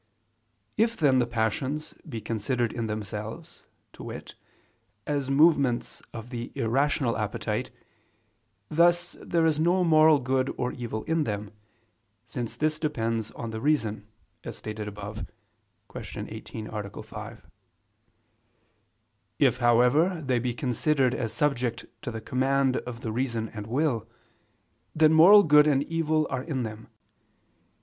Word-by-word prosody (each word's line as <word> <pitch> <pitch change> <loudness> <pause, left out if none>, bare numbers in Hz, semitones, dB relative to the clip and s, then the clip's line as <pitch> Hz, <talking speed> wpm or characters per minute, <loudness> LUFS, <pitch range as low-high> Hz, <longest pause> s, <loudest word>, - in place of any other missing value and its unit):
If 230 +2 +2
then 135 -5 +4
the 120 - +1
passions 120 +6 -2 0.2
be 115 -5 -5
considered 115 +2 -1
in 115 -2 -3
themselves, 105 0 -6 0.3
to - - -12
wit, - - -8 0.7
as 140 -2 -1
movements 140 -4 +3
of 115 +2 -9
the 120 0 -5
irrational 135 0 +1
appetite, 105 -2 -2 1.0
thus 175 +3 +3
there 165 -1 +1
is 155 -2 +2
no 175 +3 +3
moral 155 -2 +6
good 130 0 0
or 125 - -1
evil 115 -3 -5
in 160 -1 +1
them, 105 -2 -4 0.7
since 120 0 -5
this 155 0 0
depends 115 -7 -1
on 115 -1 -6
the 110 0 -5
reason, 115 -8 0 0.4
as - - -7
stated 105 -1 -6
above 105 +1 -6 0.6
(Q. - - -6
18, 110 - -7
A. 105 -1 -6
5). 110 +1 -9 1.9
If, 135 -5 +3
however, 130 +9 +3
they 130 -2 +1
be 120 0 -2
considered 130 +1 +1
as 115 -4 -2
subject 120 -2 -1 0.2
to 135 - -4
the 110 -2 -5
command 135 +2 +1
of 120 -1 -6
the 110 - -3
reason 115 -2 -2
and 105 -1 -8
will, 120 -3 0 0.9
then 155 0 +5
moral 195 +6 +9
good 150 -2 +6
and 140 -2 +3
evil 155 -1 0
are 130 - -1
in 135 -3 -3
them. 110 0 -7
125 Hz, 135 wpm, -27 LUFS, 110-150 Hz, 1.9 s, moral